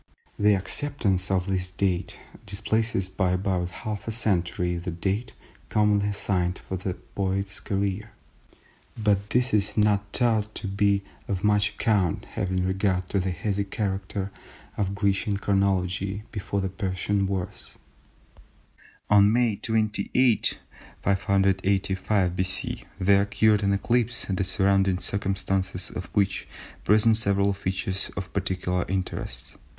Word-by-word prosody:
The 105 0 +5
acceptance 100 -3 0
of 95 -2 +1
this 95 -2 -1
date 95 -2 -1 0.3
displaces 110 -1 0
by 95 -1 0
about 90 -1 0 0.2
half 105 -1 -4
a - - -1
century 90 -5 0
the 90 +2 -4
date 95 +7 -2 0.4
commonly 105 -1 +3
assigned 95 -3 0
for 95 - -6
the 90 0 -3
poet's 100 +1 -3
career, 100 +1 -2 0.9
but 105 -2 +1
this 125 -1 +1
is 105 0 +1
not 105 -1 +3
thought 110 -3 +1
to - - -4
be 100 0 +2 0.2
of 95 -2 -2
much 105 0 +2
account 100 -7 +1
having 95 -1 -1
regard 95 -1 0
to 100 - +1
the 95 0 -1
hazy 100 +3 -1
character 100 -1 -3 0.4
of 100 -1 -1
Grecian 100 0 +1
chronology 95 0 0
before 100 -1 -2
the 95 - -1
Persian 95 +1 -1
wars. 95 -2 -5 1.3
On 105 0 +6
May 115 -3 +2
28, 110 +2 +2 0.5
585 95 -1 +1
B.C. 95 0 -3
there 100 +1 +5
occurred 105 +1 +3
an 100 -1 +2
eclipse 120 +4 +1
the 95 0 -1
surrounding 95 0 +2
circumstances 95 -1 -1
of 90 - -5
which 100 -2 +1 0.4
present 110 +2 +5
several 100 -2 +2
features 95 0 -2
of 95 -2 -5
particular 90 -1 -1
interest. 90 -10 -4
100 Hz, 125 wpm, -26 LUFS, 95-105 Hz, 1.3 s, On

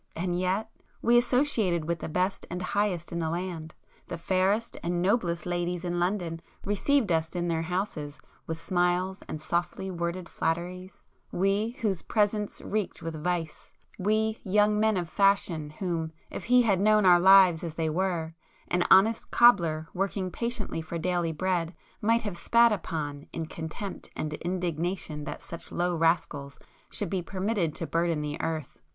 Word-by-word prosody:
—and 175 +1 -1
yet,—we 220 +5 -1
associated 240 - +2
with 170 0 -1
the - - -5
best 180 +4 -1
and 180 - -4
the 180 - -3
highest 200 -5 0
in 170 - -2
the 160 -1 -1
land;—the 170 -1 -6
fairest 190 +6 +1
and 175 +1 -1
noblest 175 -3 +1
ladies 175 0 -2
in 175 0 -1
London 175 -3 -1 0.2
received 210 +3 +2
us 160 +1 0
in 175 0 -1
their 165 -1 0
houses 165 -4 -3 0.3
with 160 0 -4
smiles 180 +2 0
and 155 - -5
softly 175 +4 -2
worded 170 0 -3
flatteries—we—whose 190 - -2
presence 210 -1 0
reeked 215 -2 -3
with 160 -2 -5
vice; 170 -3 -3 0.3
we, 215 +3 +1
'young 210 +1 +3
men 220 -1 +3
of 175 -2 -2
fashion' 190 -5 +2
whom, 160 0 -3 0.2
if - - -6
he 250 +1 +5
had 200 -5 +2
known 215 0 +4
our 175 -1 +7
lives 185 -2 +7
as 165 -2 -5
they 160 -1 -1
were, 165 -1 -1 0.4
an 180 0 +2
honest 215 +4 +5
cobbler 170 -10 +4
working 190 0 -2
patiently 235 -5 -3
for 160 +1 -5
daily 175 0 0
bread, 175 0 -1 0.3
might 230 +2 +2
have 200 -5 -4
spat 235 +5 +4
upon, 155 -7 -3
in 165 - -4
contempt 160 +5 -6
and 155 0 -3
indignation 170 -2 -3
that 150 - -6
such 170 - -7
low 175 0 0
rascals 160 -4 0 0.3
should 205 - -2
be 190 -2 0
permitted 185 -2 -1
to 165 - -3
burden 165 -1 0
the 150 +1 -4
earth! 160 -4 -4
180 Hz, 155 wpm, -28 LUFS, 165-200 Hz, 0.4 s, our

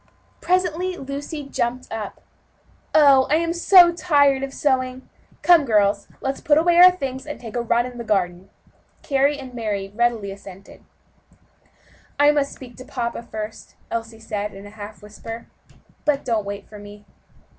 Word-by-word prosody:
Presently 365 0 0
Lucy 285 +2 -6
jumped 250 -1 -3
up. 220 -2 -6 0.7
"Oh! 280 -4 +6
I 300 - +4
am 335 +1 0
so 350 0 +6
tired 285 -5 +2
sewing; 260 -2 -1 0.4
come, 335 -1 +6
girls, 205 -4 +2
let's 270 0 -3
put 295 -1 +3
on 325 +2 +2
our 350 +1 +8
things, 270 -7 -5
and 295 - -6
take 230 -2 -9
a 240 - 0
run 235 +1 +1
in 250 -1 -8
the - - -4
garden." 190 -3 -1 0.5
Carry 280 +1 +1
and 260 -2 -10
Mary 205 -4 -3
readily 230 -3 0
assented. 195 0 -13 1.4
"I 290 0 +6
must 290 -2 0
speak 245 -3 -12
to 255 - -9
papa 235 -2 -4
first," 220 -2 -8 0.2
Elsie 225 -1 -4
said 210 -2 -4
in 195 +1 -11
a 205 - -11
half 210 0 -10
whisper, 225 +2 -9 0.6
"but 290 -2 0
don't 225 -4 0
wait 200 0 -6
for 210 - -12
me." 205 0 -13
250 Hz, 155 wpm, -22 LUFS, 210-290 Hz, 1.4 s, our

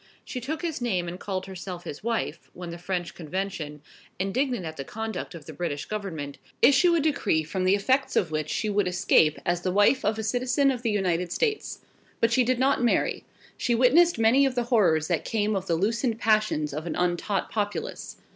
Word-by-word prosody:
She 250 - -5
took 310 +7 -4
his 325 -6 -3
name 185 -8 0
and 175 +2 -6
called 190 -2 -3
herself 185 -2 -7
his 145 - -8
wife, 230 0 -2
when 175 -1 -7
the 170 - -8
French 180 -1 -3
Convention, 160 -3 -5 0.3
indignant 230 +2 -1
at 160 0 -6
the 140 - -5
conduct 220 +1 -5
of 160 -3 -10
the 160 - -9
British 145 -2 -3
Government, 160 -10 -5 0.2
issued 310 +7 +5
a - - +3
decree 275 - +1
from 185 +4 -3
the 190 +2 +5
effects 260 +7 +1
of 170 - +1
which 155 -1 -2
she 185 +8 -1
would 205 -2 +1
escape 175 -4 +3
as 175 0 0
the 185 - -1
wife 205 +7 +4
of 215 +1 +1
a 220 - -3
citizen 255 +5 +2
of 250 -3 -4
the 235 - 0
United 180 -4 0
States. 435 - -1 0.4
But 230 - +2
she 255 - +4
did 250 +1 +1
not 265 0 +2
marry. 240 - +1 0.3
She 240 - +1
witnessed 295 +8 +5
many 225 +5 +4
of 265 -2 +1
the 245 - +1
horrors 160 -8 +3
that 170 -3 0
came 215 -1 0
of 190 -1 -3
the 170 - +2
loosened 225 +6 0
passions 215 -10 +1
of 155 +3 -5
an - - -3
untaught 180 +3 -1
populace. 205 -1 -3
200 Hz, 205 wpm, -26 LUFS, 175-240 Hz, 0.4 s, issued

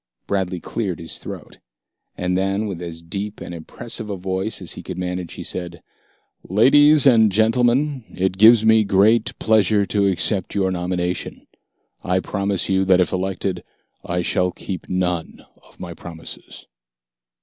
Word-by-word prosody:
Bradley 95 -2 -2
cleared 95 -1 -3
his 80 -1 -1
throat. - - -9 0.6
And 90 0 -1
then, 95 +3 0
with 95 -5 -5
as 85 -1 -7
deep 100 +5 -5
and - - -7
impressive 85 +6 -8
a 100 - -3
voice 95 +3 -3
as 90 - -8
he - - -8
could 95 - -7
manage, 90 -1 -4
he - - -7
said, 85 -2 -6 0.7
"Ladies 145 - +6
and 110 -5 +6
gentlemen, 120 +5 +2
it 95 +1 -2
gives 110 +1 +7
me 110 0 +5
great 105 +3 +3
pleasure 105 -2 +3
to 100 0 +1
accept 95 +1 -1
your 95 -2 +1
nomination. 90 0 -3 0.6
I 90 +1 +1
promise 100 -1 -2
you 95 0 +2
that 95 -1 +4
if 90 - +2
elected 95 -1 -2 0.4
I 90 0 -2
shall 90 +1 +1
keep 95 -2 -7
none 90 -2 -2 0.2
of - - -23
my 85 -2 -7
promises." 85 -1 -11
95 Hz, 150 wpm, -21 LUFS, 90-105 Hz, 0.7 s, gives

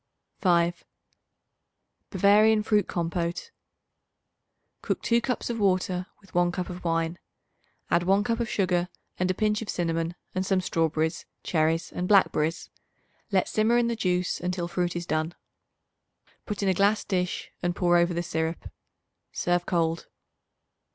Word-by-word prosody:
5. 175 -2 +2 1.3
Bavarian 210 +3 +4
Fruit 210 -3 +2
Compote. 170 - -3 1.3
Cook - - -1
2 235 0 +3
cups 250 -1 -2
of 230 - -4
water 185 -2 +1
with 195 - -22
1 175 0 +3
cup 180 0 -4
of 180 0 -8
wine. 165 0 -1 0.7
Add 170 - +4
1 195 +3 +3
cup 230 +1 -1
of 235 -2 -1
sugar 180 -2 +1 0.3
and 180 0 +1
a 185 - +1
pinch 210 +2 +1
of 225 - -6
cinnamon 165 0 -1 0.2
and 185 - -1
some 190 0 +1
strawberries, 160 -3 -1 0.2
cherries 160 0 0
and 180 - -3
blackberries. 165 -5 +2 0.6
Let 190 -2 +2
simmer 220 +2 +2
in 235 -1 +2
the 235 - -1
juice 180 -4 0
until 180 -1 -2
fruit 175 0 -1
is 175 0 -3
done. 155 +1 -1 1.1
Put 210 -1 -3
in 195 - +2
a - - +4
glass 200 +3 +2
dish 180 -3 -2
and 175 0 -1
pour 175 -1 +3
over 170 0 +2
the 170 - -1
syrup. 160 0 -3 0.6
Serve 175 0 0
cold. 165 -2 0
180 Hz, 145 wpm, -27 LUFS, 170-200 Hz, 1.3 s, Bavarian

